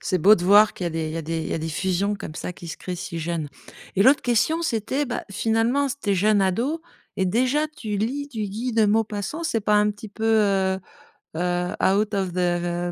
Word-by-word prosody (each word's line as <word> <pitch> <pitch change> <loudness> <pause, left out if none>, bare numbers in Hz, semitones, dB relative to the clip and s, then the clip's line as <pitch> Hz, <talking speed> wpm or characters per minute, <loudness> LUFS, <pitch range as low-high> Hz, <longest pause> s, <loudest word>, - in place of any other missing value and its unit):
c'est 185 - 0
beau 200 +6 +7
de 175 - -4
voir 205 +3 +6
qu'il 180 - -6
y - - 0
a - - -1
des 160 -1 -3
il - - -5
y - - -4
a 165 - -3
des 165 +1 -3
il - - -5
y - - -3
a - - -1
des 160 +1 -4
fusions 190 +5 0
comme 155 - -8
ça 180 - -5
qui 170 - -10
se - - -7
créent 180 - -5
si 170 -1 -5
jeune 165 -2 -3 0.5
et 195 - +5
l'autre 265 +6 +5
question 250 +8 +1
c'était, 265 -1 -1
bah, 250 -3 -4
finalement 225 +7 +1
s 275 0 -3
tu 205 - -1
es - - +3
jeune 205 +2 +3
ado 235 - 0 0.4
et 190 - +1
déjà 255 +10 +1
tu 215 -7 -3
lis 275 +7 -2
du 220 -5 -4
Guy 220 +5 -3
de 220 -1 +3
Maupassant, 215 - -1
c'est 230 -9 0
pas 210 +1 +1
un 210 0 +3
petit 210 +1 -9
peu 220 +2 -6
heu 195 -4 +2 0.6
heu, 180 +1 -1
out 205 +2 +2
of 190 -3 -1
the 175 -1 -1
205 Hz, 245 wpm, -24 LUFS, 180-225 Hz, 0.6 s, beau